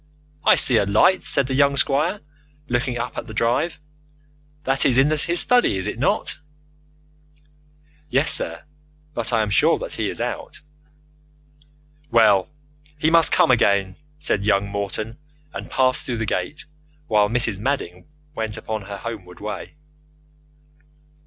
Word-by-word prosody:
"I - - +6
see 125 - +4
a 100 - +2
light," 145 - +3
said 140 - +2
the 130 - -3
young 140 +1 +3
squire, 155 +10 +1 0.5
looking 120 0 -1
up 120 - -4
the 110 - -9
drive. 120 +9 0 0.9
"That 135 -1 +2
is 125 - +3
in 135 +3 +4
his 170 +3 +1
study, 245 - +4
is 95 - -4
it 105 +2 -5
not?" 140 - -1 1.7
"Yes, 135 +4 +2
sir; - - +1 0.5
but 120 -4 -1
I 115 -2 +2
am 105 - -4
sure - - +3
that - - -6
he - - -2
is - - -6
out." - - -5 1.5
"Well, 105 -5 +4 0.5
he 155 +1 +1
must 165 -1 +5
come - - +4
in - - +6
again," 100 -4 +1 0.2
said 100 -8 -1
young 100 -1 +1
Morton, 100 +4 -5 0.3
and - - -7
passed 130 -1 +1
through 120 -2 -4
the 115 - -2
gate 145 +7 -3 0.4
while 105 -5 +2
Mrs. 115 -4 +1
Madding 105 -8 -3 0.3
went 110 -5 -4
upon 110 -1 -5
her 100 0 -7
homeward 100 -5 -8
way. 105 +6 -7
115 Hz, 145 wpm, -21 LUFS, 105-140 Hz, 1.7 s, I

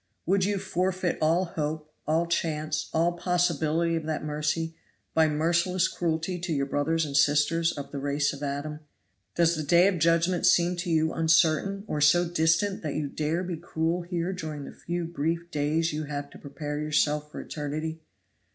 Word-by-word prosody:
Would 190 +2 +2
you 205 0 0
forfeit 185 -1 -1
all 165 +4 +3
hope, 155 -2 -4
all 160 +2 +2
chance, 155 -2 -1
all 165 +2 +2
possibility 170 -2 +1
of 160 -1 -3
that 155 -2 -2
mercy, 155 +2 -2 0.4
by 160 -1 +4
merciless 170 +4 +2
cruelty 170 +1 -2
to 175 0 -4
your 140 -3 +1
brothers 155 +4 0
and 140 -2 -5
sisters 150 +4 +3
of 140 - -6
the 140 - -4
race 140 +1 0
of 140 - -9
Adam? 145 +2 -3 0.6
Does 170 0 +3
the 155 - -2
day 170 +5 +5
of 190 -4 0
judgment 170 +2 +3
seem 175 +1 +4
to 175 +1 -3
you 160 -1 +2
uncertain 165 +4 +2
or 150 -7 -3
so 175 +4 +5
distant 165 +4 +1
that 150 -3 -3
you 150 -2 -2
dare 155 +5 -1
be 175 -2 -4
cruel 165 +1 -1
here 175 +1 -2
during 155 -5 -5
the - - -9
few 175 0 -4
brief 170 +1 -2
days 155 +2 0
you 155 0 -3
have 145 -1 -5
to - - -13
prepare 145 +1 -5
yourself 150 0 0
for - - -7
eternity? 155 +2 -4
160 Hz, 180 wpm, -27 LUFS, 150-175 Hz, 0.6 s, day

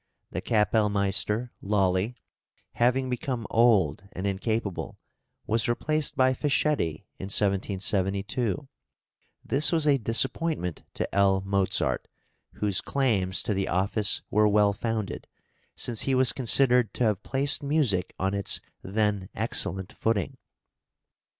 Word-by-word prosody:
" - - -52
The - - -1
kapellmeister 105 +1 +1
Lolli, 100 +2 0 0.6
having 125 +2 +1
become 125 -1 -3
old 100 -7 +3
and 95 - -5
incapable, 100 0 -3 0.5
was 115 +3 0
replaced 155 +5 -1
by 130 0 +4
Fischietti 140 - 0
in - - -5
1772; 100 +4 -1 0.8
this 145 +3 +2
was 160 -3 +1
a 140 -2 +4
disappointment 115 - -1
to - - -3
L. 95 -1 +3
Mozart, 100 -1 0 0.5
whose 100 -3 0
claims 105 -9 0
to 110 - -1
the 95 0 -1
office 100 +3 +1
were 105 +1 +4
well 105 -1 +3
founded, 110 -1 -4 0.5
since 115 -3 -1
he 135 - +1
was 130 -1 +3
considered 125 -2 +3
to - - 0
have 105 -3 +1
placed 135 +4 +1
music 140 - +2
on 95 +1 -1
its 100 0 0 0.2
then 100 -1 -1
excellent 95 -3 0
footing. 110 -5 -2
105 Hz, 120 wpm, -27 LUFS, 95-125 Hz, 0.8 s, by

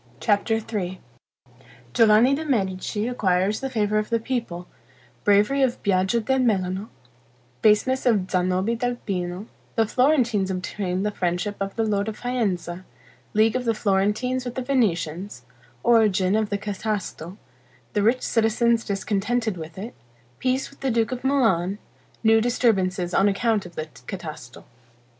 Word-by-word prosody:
CHAPTER 210 +4 +2
III 205 -5 -4 0.9
Giovanni 225 - +5
de' 300 +3 -1
Medici 205 -3 -1
acquires 195 -4 +1
the 270 - -3
favor 215 -3 +1
of 215 - -4
the 230 -1 +1
people 225 -8 -4 0.6
Bravery 210 +7 +3
of 255 -2 +1
Biaggio 190 +3 +2
del 265 +4 +1
Melano 195 -4 0 0.7
Baseness 235 +5 +3
of 205 -6 +2
Zanobi 185 +4 +1
del 245 +1 -1
Pino 180 -3 -4 0.3
The 225 - +3
Florentines 240 -6 +2
obtain 185 0 -2
the 210 - 0
friendship 180 +2 -2
of 195 0 -3
the 225 - 0
lord 205 -1 0
of 220 - -4
Faenza 190 -8 -2 0.5
League 220 +2 +4
of 255 - 0
the 230 -1 +1
Florentines 210 +6 0
with 245 -1 -6
the 260 - -2
Venetians 185 - -1 0.4
Origin 210 -5 +3
of 215 -1 0
the 205 - -1
Catasto 200 -3 -4 0.6
The 210 - +1
rich 235 +5 +2
citizens 230 +1 +2
discontented 210 +2 -1
with 165 0 -9
it 220 +6 -6 0.5
Peace 260 +2 -1
with 275 - -20
the 270 - -1
duke 230 -1 +1
of 250 -1 -4
Milan 205 -9 +2 0.5
New 225 0 +5
disturbances 190 -7 +1
on 195 - +4
account 210 -1 0
of 175 - -16
the 155 - -3 0.2
Catasto. 155 -10 -8
210 Hz, 145 wpm, -24 LUFS, 190-235 Hz, 0.9 s, Giovanni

